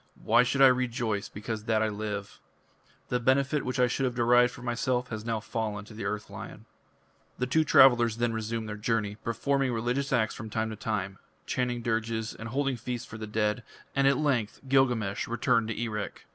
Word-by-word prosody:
Why - - +5
should 135 +2 +3
I - - +10
rejoice 120 -5 0
because 105 +1 -5
that 110 -1 +2
I - - +2
live? 105 -1 -5 0.7
The 125 - +1
benefit 135 +3 +2
which 130 +1 -3
I 125 - +6
should 130 +2 0
have 125 -1 -1
derived 120 +1 +4
for 125 - -11
myself 125 +1 -1
has 110 -1 -5
now 115 -1 -1
fallen 105 -1 -4
to 110 - -13
the 110 - -6
Earth 105 0 -3
Lion." - - -9 0.7
The 125 - 0
two 155 +5 +2
travellers 120 -6 +6
then 120 -1 0
resumed 110 0 -3
their 105 0 -5
journey, 105 -1 -1
performing 135 +3 0
religious 120 +4 -1
acts 110 -1 +2
from 110 - -7
time 110 +1 -2
to - - -5
time; 100 -3 -3 0.3
chanting 120 -2 -1
dirges 110 -1 -1
and 115 +1 -8
holding 135 0 0
feasts 120 +1 -5
for 110 - -9
the 110 - -5
dead, 105 +1 0 0.3
and 135 0 +3
at 140 - +4
length 130 -8 0
Gilgamesh 125 -7 +2
returned 115 -1 +1
to 110 - -4
Erech. 110 -3 -4
115 Hz, 195 wpm, -28 LUFS, 110-125 Hz, 0.7 s, I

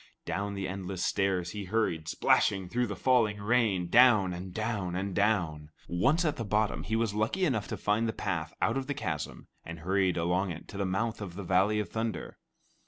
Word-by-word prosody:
Down 100 +1 -2
the 95 -1 -3
endless 95 -1 -4
stairs 95 -3 0
he 105 0 -5
hurried, 90 -6 -1
splashing 95 +3 +2
through 125 +3 0
the 100 - -4
falling 110 -2 +2
rain, 105 -4 +2
down, 110 -3 +5
and 90 +1 -6
down, 105 -3 -2
and 95 +1 -2
down. 85 -8 0 0.2
Once 135 - +2
at 155 -1 0
the 115 - -2
bottom, 105 0 0
he 110 - -2
was 115 -2 0
lucky 110 - +1
enough 115 - 0
to - - -4
find 105 +2 +1
the - - 0
path 90 -8 -3
out - - +2
of 135 -1 -3
the 145 - -2
chasm, 80 - -4 0.2
and 85 -1 -8
hurried 95 +1 +1
along 90 +3 +1
it 85 -1 -7
to 100 - -7
the 100 -1 0
mouth 110 +4 -1
of 90 -4 -6
the 100 - -5
Valley 95 +4 +2
of 105 -4 -3
Thunder. 110 +2 -4
100 Hz, 205 wpm, -30 LUFS, 90-110 Hz, 0.2 s, down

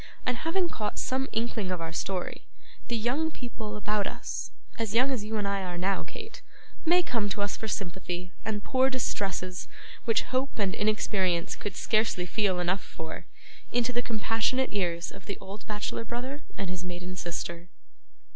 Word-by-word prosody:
And 250 -1 +2
having 345 +6 +2
caught 215 -10 -2
some 265 +1 +1
inkling 225 -3 0
of 180 -1 0
our 165 0 -3
story, 185 +1 -2 0.4
the 235 - +1
young 255 +9 +2
people 230 -7 -5
about 210 0 +2
us - - -3 0.3
as 225 -2 0
young 255 +4 +6
as 245 -6 0
you 215 +1 -1
and 205 -1 +1
I 200 0 +1
are 180 -2 -3
now, 190 +2 +2
Kate 450 +1 -7 0.4
may 355 +2 +7
come 225 -9 +1
to 205 - 0
us 205 - 0
for 220 - -4
sympathy, 180 -2 -2
and 210 -1 -1
pour 260 0 +4
distresses 195 -8 0 0.4
which 225 -2 +4
hope 260 +2 0
and 200 -3 +2
inexperience 195 -5 +2
could 205 -3 -4
scarcely 215 -5 +3
feel 195 -1 +2
enough 180 +2 +2
for, 160 0 -6 0.4
into 245 +1 +2
the 240 - +3
compassionate 225 +3 +2
ears 170 -4 +1
of 195 - -11
the 200 - -2
old 200 +2 -8
bachelor 210 +1 -1
brother 255 +5 -3 0.2
and 195 -2 -1
his 185 0 -3
maiden 180 0 -4
sister. 170 0 -3
210 Hz, 175 wpm, -30 LUFS, 185-240 Hz, 0.4 s, may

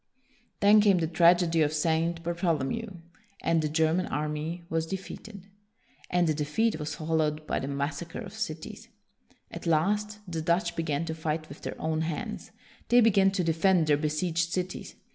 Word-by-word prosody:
Then 210 +1 +7
came 200 -3 +5
the 165 - +1
tragedy 170 0 +4
of 150 -1 +3
St. 165 +2 0
Bartholomew, 170 - -1 0.5
and 165 -1 +2
the 155 - -1
German 160 +3 +1
army 150 +4 -3
was 165 -1 -1
defeated. 195 +2 -7 0.6
And 180 0 +2
the 155 - +2
de 150 0 -2
feat 215 +7 0
was 150 +1 -4
followed 155 -1 -1
by - - -1
the 135 - -4
massacre 140 +4 -3
of 205 -4 -8
cities. 165 -8 -6 0.6
At - - -7
last, 205 +6 +1
the 165 -2 -3
Dutch 170 +1 +1
began 160 -1 -1
to 160 - -3
fight 160 0 -3
with 140 - -11
their - - -6
own 160 0 -1
hands. 160 -1 -4 0.4
They 245 - +6
began 200 -4 +5
to 190 -2 -1
defend 165 +1 +3
their 150 -1 +4
besieged 160 +3 -1
cities. 180 0 -4
165 Hz, 165 wpm, -28 LUFS, 155-185 Hz, 0.6 s, Then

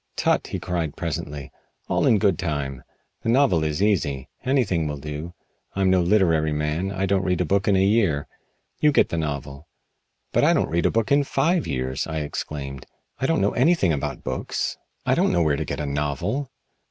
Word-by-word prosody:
"Tut!" - - +1
he - - -4
cried 85 -4 -3
presently. 75 -4 -4 0.4
"All - - +1
in 110 - +5
good 95 -5 +2
time! 70 -6 -3 0.4
The - - -2
novel 120 - +3
is 75 +4 0
easy. 75 -10 0
Anything 120 - +1
will 75 -1 -4
do. 75 +4 -6 0.4
I'm 95 -1 +2
no 95 -1 +4
literary 85 -5 +3
man. 75 +5 -1
I 95 0 -1
don't 95 0 +2
read 90 -2 0
a 90 - +1
book 100 +4 +1
in 100 - +4
a 95 0 +4
year. 100 -9 +2 0.5
You 150 - +4
get - - +3
the 85 - -2
novel." 70 -1 -4 0.7
"But - - +3
I - - +5
don't - - 0
read 85 +1 +2
a - - +2
book 115 +2 0
in 145 0 +5
five 160 +6 +1
years!" 65 +2 -2
I 80 -1 -2
exclaimed. 70 -3 -5 0.3
"I 135 - 0
don't 165 - +2
know 100 - +2
anything 130 - +3
about 70 - -3
books. - - -2 0.3
I - - +3
don't - - +2
know 85 - +2
where 75 -2 +2
to 80 - -3
get 70 +1 -4
a 75 - -2
novel." 75 - -2
85 Hz, 200 wpm, -24 LUFS, 75-100 Hz, 0.7 s, in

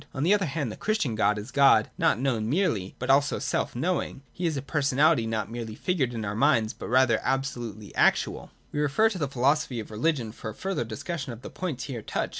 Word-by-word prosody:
On 135 - -1
the 180 +6 +4
other 200 -4 +2
hand, 140 -4 -2
the - - -7
Christian 215 - -1
God 105 -1 +2
is 105 +6 -7
God 135 -6 +5
not 110 - +2
known 120 -5 0
merely, 120 - 0
but 130 +1 0
also 140 +1 +3
self 135 - -2
knowing; 155 -1 -2
He 175 - -2
is 155 -3 -1
a 135 - -4
personality 145 -2 +2
not 110 -2 -2
merely 115 -2 -5
figured 135 -9 -1
in 110 -2 -3
our 100 - -2
minds, 115 -2 +2
but - - -8
rather 125 -2 +4
absolutely 120 -6 -3
actual. - - +1 0.2
We 145 - -3
must 150 -1 +2
refer 220 +5 +4
to 195 -5 -5
the 145 - 0
Philosophy 135 -1 +1
of 110 - -7
Religion 120 0 0
for 110 0 -7
a 110 - -8
further 190 -10 -2
discussion 135 - -5
of 115 +2 -12
the - - -8
points 165 -9 -4
here 125 -5 -5
touched. - - -2
130 Hz, 225 wpm, -27 LUFS, 115-150 Hz, 0.2 s, God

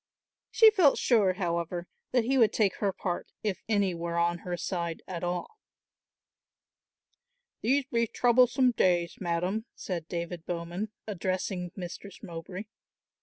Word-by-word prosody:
She 445 -1 +7
felt 360 -10 +5
sure, 210 -7 +3
however, 175 -1 -2 0.2
that 250 -2 +3
he 260 +4 +1
would 225 -5 +5
take 205 -4 +1
her 200 -2 +1
part 180 -2 -3 0.2
if 205 -3 -1
any 200 -4 +2
were 170 0 -3
on 170 0 +2
her 175 0 -4
side 170 -2 -3
at 180 -2 -5
all. 180 - -3 2.0
"These 270 +4 +2
be 235 -3 +1
troublesome 250 +2 +4
days, 175 -6 +2
madam," 180 +5 -1
said 170 -4 -4
David 170 -1 -5
Bowman, 175 +4 -3
addressing 185 -2 -2
Mistress 185 +1 -8
Mowbray. 175 +3 -6
185 Hz, 130 wpm, -29 LUFS, 175-220 Hz, 2.0 s, She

